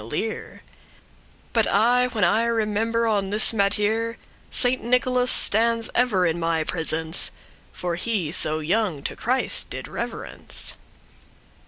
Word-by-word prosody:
*innocent 115 +7 -4
learn 220 - -7 0.9
But 225 -2 +2
aye 245 +4 +3
when 225 -5 -2
I 220 +6 +3
remember 225 0 0
on 205 -3 0
this 210 +3 +2
mattere, 215 +3 +1 0.3
Saint 250 0 +1
Nicholas 250 +1 +1
<6> - - +6
stands 230 +1 +1
ever 225 -7 +2
in 170 0 0
my 165 -1 0
presence; 160 0 0 0.4
For 175 -1 -4
he 185 -6 -2
so 155 -2 0
young 175 -3 -1
to - - -4
Christ 255 +3 +1
did - - -6
reverence. - - -5
215 Hz, 135 wpm, -23 LUFS, 175-230 Hz, 0.9 s, <6>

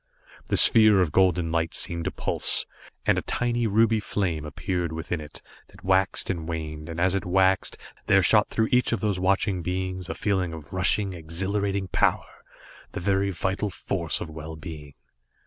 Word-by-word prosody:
The - - 0
sphere 110 -4 +6
of 90 -5 +2
golden 90 -2 +2
light 80 0 -1
seemed 85 -1 -2
to - - -1
pulse, - - 0 0.4
and - - +3
a - - -4
tiny 120 -1 -1
ruby 110 +1 +3
flame 90 -7 -2
appeared 85 +3 -3
within 80 +1 -4
it, 75 0 -10 0.2
that - - -18
waxed 95 +1 +1
and 85 -2 -5
waned, 75 -1 -5
and 85 0 -5
as 90 +1 +2
it 100 - -1
waxed, 95 +1 +2 0.3
there 95 -1 +5
shot 105 +4 +4
through 110 0 0
each 125 0 +3
of 115 - -2
those 105 -4 0
watching 95 0 +1
beings 90 +1 -3
a - - -3
feeling 95 -5 -1
of 80 0 -10
rushing, 95 +1 +1
exhilarating 95 +4 -2
power, - - 0 0.5
the 100 - -4
very 100 +1 +1
vital 95 +3 -2
force 85 -2 -1
of - - -5
well 80 0 -8
being. 75 -3 -9
95 Hz, 175 wpm, -25 LUFS, 80-100 Hz, 0.5 s, sphere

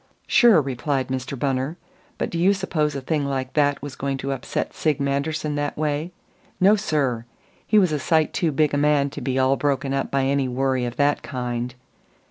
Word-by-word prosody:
"Sure," 235 -8 +6
replied 135 -1 -2
Mr. 130 +1 -3
Bunner. 135 +4 -1 0.4
"But - - -2
do 170 - -2
you 195 +4 +4
suppose 155 -6 -1
a 140 - -3
thing 150 +2 -1
like 135 -2 -3
that 145 -2 +1
was 145 -2 -6
going 135 0 -2
to 135 +1 -3
upset 135 -2 -3
Sig 155 -3 0
Manderson 145 +2 -1
that 145 0 -2
way? 150 +2 -1 0.5
No, 200 +3 +6
sir! 140 - -1 0.4
He 215 - +3
was 185 -5 +4
a 150 - 0
sight 160 +2 +1
too 165 -3 +1
big 150 +1 +1
a - - +2
man 145 -1 +2
to - - -7
be 130 -1 -1
all 130 +1 +3
broken 140 -1 0
up 135 - -1
by 135 -1 +1
any 135 0 +1
worry 130 0 0
of 120 - -4
that 145 0 +2
kind." 125 -1 -4
140 Hz, 200 wpm, -23 LUFS, 130-155 Hz, 0.5 s, Sure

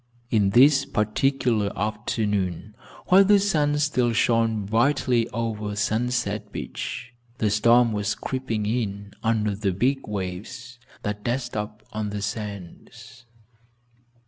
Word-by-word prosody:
On 105 -3 +4
this 135 +6 +6
particular 115 -2 0
afternoon, 105 -2 -2 0.4
while 190 +2 +8
the 200 +1 +5
sun 150 -7 +1
still 130 -5 +1
shone 115 -2 +2
brightly 120 +2 +2
over 110 -3 -3
Sunset 105 -1 -1
Beach, 125 - -6 0.2
the 105 -4 +1
storm 115 +3 +4
was 105 -1 -1
creeping 120 -5 -3
in 100 -3 -3
under 110 -3 0
the 100 -1 -1
big 130 +9 0
waves 105 +6 -6 0.2
that 105 0 -4
dashed 125 +1 -2
up 105 0 -5
on 105 -1 -2
the 100 -1 -4
sands. 105 0 -7
110 Hz, 120 wpm, -24 LUFS, 105-125 Hz, 0.4 s, while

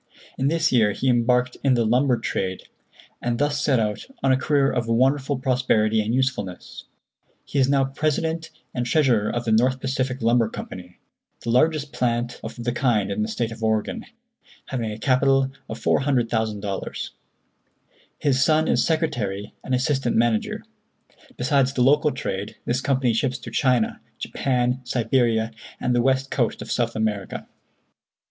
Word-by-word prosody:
In 135 - 0
this 165 +1 +2
year 110 -5 +3
he 130 - 0
embarked 125 +1 +2
in 135 -2 +4
the 120 -1 +2
lumber 125 +3 +3
trade, 95 -4 -3 0.6
and 120 -1 -1
thus 145 +1 0
set 135 -4 +2
out 105 -1 -2 0.2
on 135 - +4
a - - +5
career 140 0 +2
of 120 -2 -1
wonderful 135 +4 +2
prosperity 125 -4 +2
and 105 +1 -2
usefulness. 125 -8 -2 0.6
He 140 - -2
is 130 0 +3
now 140 -1 +3
president 160 +4 -1 0.2
and 125 -1 -2
treasurer 120 -7 +3
of 120 0 -3
the 115 - 0
North 130 +4 +3
Pacific 130 -1 -2
Lumber 115 -1 +3
Company, 90 -4 -9 0.4
the 115 - -2
largest 150 +3 +2
plant 120 0 -1
of - - -6
the 120 - 0
kind 110 -6 +1
in 100 +2 -1
the 105 - 0
State 115 +1 -2
of 115 0 -8
Oregon, 110 - -1 0.6
having 115 -5 -2
a 105 - -6
capital 135 +2 +2 0.2
of - - -6
$400,000. 110 -7 -1 1.1
His 135 -2 +2
son 155 +2 +3
is - - +3
secretary 110 - -1
and 130 - 0
assistant 135 -1 0
manager. 115 -2 +1 0.7
Besides 135 +1 +2
the 125 - +2
local 150 +3 +4
trade, 100 -3 -4
this 125 +2 0
company 130 -4 +1
ships 130 +3 0
to - - -9
China, 125 -5 +1 0.2
Japan, 125 -1 -1
Siberia 120 -2 +1 0.3
and 125 - 0
the 120 - +3
west 135 +1 +1
coast 120 -4 0
of 110 - -8
South 120 -1 0
America. 105 -3 -2
125 Hz, 155 wpm, -23 LUFS, 115-135 Hz, 1.1 s, a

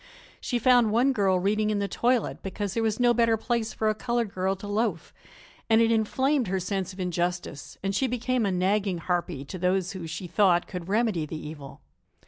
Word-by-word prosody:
She 245 - -2
found 245 -1 +4
one 250 +5 +3
girl 195 -5 +2
reading 210 +3 +1
in 210 - 0
the 200 0 -1
toilet, 245 +2 0
because 195 0 -4
there 230 - 0
was 220 0 0
no 240 -1 +4
better 230 -1 +3
place 230 -1 -1
for 220 - -2
a 215 - +3
colored 235 -1 -2
girl 190 +1 0
to 195 - -10
loaf, 205 -4 -2 0.6
and 225 0 +5
it 230 0 +4
inflamed 260 +4 +1
her 190 +1 -1
sense 190 0 -3
of 190 - -13
injustice 175 -4 -3
and 195 0 -1
she 265 +7 +1
became 250 0 -1
a 200 - +1
nagging 190 +1 +1
harpie 170 -5 -2
to 185 - -7
those 185 +1 +1
who, 185 -4 -6
she 160 +4 -6
thought, 180 -1 +3
could 180 -2 -6
remedy 205 -7 +1
the 160 - -6
evil. 150 -3 -9
200 Hz, 205 wpm, -26 LUFS, 180-230 Hz, 0.6 s, and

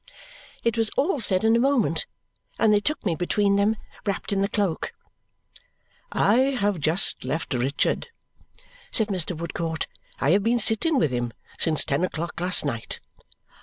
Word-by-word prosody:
It 230 -1 +1
was 225 -1 +2
all 290 +1 +2
said 190 -4 0
in 225 +1 +4
a - - +3
moment, 275 - +2 0.5
and 220 -1 +4
they 205 - +5
took 300 +6 -2
me 180 - +2
between 200 +4 +1
them, 205 +2 +2 0.3
wrapped 200 0 -2
in 195 - +1
the 200 - +1
cloak. 205 - -1 1.2
"I 215 +5 +3 0.2
have 200 -3 +1
just 160 +5 +2
left 145 +4 -3
Richard," 130 - 0 0.8
said 220 -2 +1
Mr. 180 -3 0
Woodcourt. 165 -1 -3 0.3
"I 140 - +2
have 200 +3 +4
been 230 +4 +2
sitting 235 +8 +2
with 155 - +2
him 120 -1 -2 0.3
since 160 -3 +1
ten 140 +5 0
o'clock 170 -1 -3
last 180 -3 +2
night." 115 -5 -4
195 Hz, 160 wpm, -25 LUFS, 160-220 Hz, 1.2 s, they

